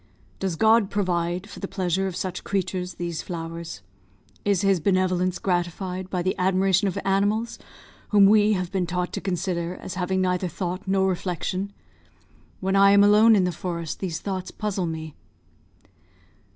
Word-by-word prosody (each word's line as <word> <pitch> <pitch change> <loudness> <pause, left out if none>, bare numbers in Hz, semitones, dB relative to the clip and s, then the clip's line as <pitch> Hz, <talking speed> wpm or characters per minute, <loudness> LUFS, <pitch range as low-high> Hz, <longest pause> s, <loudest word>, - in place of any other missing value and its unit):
Does 190 -3 -1
God 220 +2 +4
provide, 180 -1 -1
for 205 - -10
the 195 - -4
pleasure 190 0 -1
of 185 - -5
such 185 -1 -4
creatures, 185 -2 -2
these 170 -2 -4
flowers? 165 - -6 0.6
Is 200 -3 +2
His 195 -2 +3
benevolence 185 0 +1
gratified 180 +1 -2
by 180 -2 -2
the 185 - 0
admiration 190 +1 +2
of 185 - -2
animals 205 +4 0 0.5
whom 205 -2 +6
we 210 +1 +5
have 185 -3 -2
been 190 -3 -1
taught 180 +1 -2
to - - -3
consider 180 -2 -2
as 185 - -7
having 190 +1 -1
neither 180 0 0
thought 180 +3 -4
nor 190 0 +2
reflection? 185 +1 -2 0.9
When 190 +1 0
I 200 0 +6
am 200 0 +7
alone 215 +2 +6
in 195 - +3
the 180 - +1
forest, 170 -1 -5
these 175 -5 -3
thoughts 190 -2 -4
puzzle 200 -4 -2
me." 160 -1 -5
185 Hz, 160 wpm, -24 LUFS, 175-195 Hz, 0.9 s, am